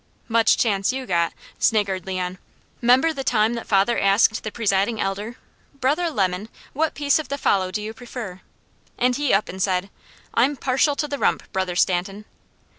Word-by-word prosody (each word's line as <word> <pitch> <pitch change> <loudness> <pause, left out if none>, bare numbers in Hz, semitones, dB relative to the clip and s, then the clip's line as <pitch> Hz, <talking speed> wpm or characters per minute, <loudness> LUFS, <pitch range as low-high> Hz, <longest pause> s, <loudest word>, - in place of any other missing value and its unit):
"Much 230 -1 +3
chance 200 -3 +1
you 260 0 -4
got," 170 -4 +1 0.3
sniggered 195 -4 +1
Leon. 185 -1 -3 0.4
"'Member 255 +7 +4
the 275 -3 -4
time 225 -2 +2
that 235 - -6
father 200 +3 +2
asked 200 +3 +3
the 215 - -5
Presiding 205 0 0
Elder, 205 +4 -3 0.4
'Brother 290 +6 0
Lemon, 195 - -1 0.2
what 315 +2 0
piece 285 0 +2
of 310 - -6
the 280 - -2
fowl 190 -8 +1
do 210 +3 -4
you 220 +1 -5
prefer?' 225 -6 -8 0.6
and 250 0 +2
he 290 -2 0
up 200 - +2
and 190 +1 -6
said: 185 0 0 0.4
'I'm 270 +5 +2
partial 270 +3 +1
to 295 - -2
the 285 -1 -4
rump, - - +1
Brother 190 -2 -1
Stanton.' 190 +3 0
220 Hz, 175 wpm, -23 LUFS, 195-255 Hz, 0.6 s, Member